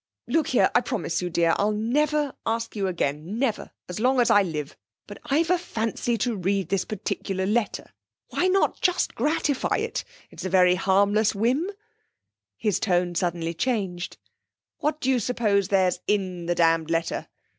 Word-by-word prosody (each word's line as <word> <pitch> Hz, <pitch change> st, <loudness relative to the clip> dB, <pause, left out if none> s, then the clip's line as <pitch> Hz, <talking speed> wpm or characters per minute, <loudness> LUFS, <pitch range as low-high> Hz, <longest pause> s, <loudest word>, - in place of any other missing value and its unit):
Look 320 Hz, -2 st, +1 dB
here, 255 Hz, -, +3 dB
I -, -, +5 dB
promise 225 Hz, -10 st, -2 dB
you, 180 Hz, -, -2 dB
dear, 170 Hz, -1 st, +2 dB
I'll 205 Hz, +1 st, +2 dB
never 290 Hz, +6 st, +1 dB
ask 230 Hz, 0 st, -2 dB
you 200 Hz, -2 st, -1 dB
again, 170 Hz, +2 st, -2 dB
never 235 Hz, -4 st, -1 dB, 0.2 s
as 180 Hz, +2 st, -5 dB
long 255 Hz, +3 st, +3 dB
as 240 Hz, -1 st, +4 dB
I 205 Hz, -, +6 dB
live. 155 Hz, -6 st, -4 dB, 0.3 s
But 205 Hz, -, -10 dB
I've 310 Hz, +4 st, +1 dB
a 360 Hz, -, +3 dB
fancy 230 Hz, -6 st, -2 dB
to 240 Hz, 0 st, -1 dB
read 195 Hz, -1 st, -1 dB
this 195 Hz, -1 st, 0 dB
particular 190 Hz, -2 st, -3 dB
letter. 210 Hz, +1 st, -1 dB, 0.4 s
Why 360 Hz, -, +1 dB
not 385 Hz, +1 st, +1 dB
just 360 Hz, -1 st, +1 dB
gratify 290 Hz, +1 st, 0 dB
it? -, -, -2 dB, 0.3 s
It's -, -, -9 dB
a 190 Hz, -, -2 dB
very 180 Hz, -1 st, +5 dB
harmless 200 Hz, +3 st, +2 dB
whim.' 255 Hz, -, +1 dB, 0.9 s
His 210 Hz, -5 st, 0 dB
tone 180 Hz, -3 st, +1 dB
suddenly 170 Hz, -1 st, -1 dB
changed. 185 Hz, -4 st, -2 dB, 0.6 s
'What 305 Hz, +1 st, -1 dB
do -, -, -2 dB
you 255 Hz, -, +2 dB
suppose 210 Hz, -4 st, +1 dB
there's 185 Hz, -2 st, +2 dB
in 185 Hz, -4 st, -1 dB
the 175 Hz, -, +1 dB
damned 165 Hz, -1 st, +2 dB
letter? 165 Hz, 0 st, -1 dB
205 Hz, 165 wpm, -25 LUFS, 180-245 Hz, 0.9 s, I